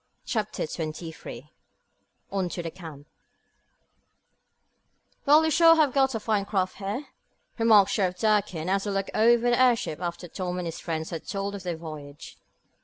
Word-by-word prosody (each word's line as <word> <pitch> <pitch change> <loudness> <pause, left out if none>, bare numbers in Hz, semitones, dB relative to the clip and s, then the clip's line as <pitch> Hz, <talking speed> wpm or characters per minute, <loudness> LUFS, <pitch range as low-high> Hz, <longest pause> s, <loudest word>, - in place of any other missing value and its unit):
Chapter 215 -3 -2
23 160 +1 -7 0.8
On 190 -3 -1
To 175 - -5
The 165 - -5
Camp 160 -6 -11 2.2
"Well, 305 +3 +6
you 315 - +1
sure 330 +1 +7
have 300 -5 +3
got 270 -2 +2
a - - -1
fine 210 -2 0
craft 190 -2 -1
here," 205 +8 -4 0.5
remarked 215 -3 +5
Sheriff 185 -3 0
Durkin, 205 -6 +1
as 195 +2 0
he - - -2
looked 195 -1 -2
over 235 +2 +4
the 240 - +3
airship 235 -10 +2
after 175 0 -4
Tom 180 0 -4
and 180 - -3
his 165 - -6
friends 160 -2 -4
had 165 -2 -6
told 200 0 -3
of 200 - -6
their 175 -3 -4
voyage. 150 -3 -10
195 Hz, 160 wpm, -26 LUFS, 170-225 Hz, 2.2 s, sure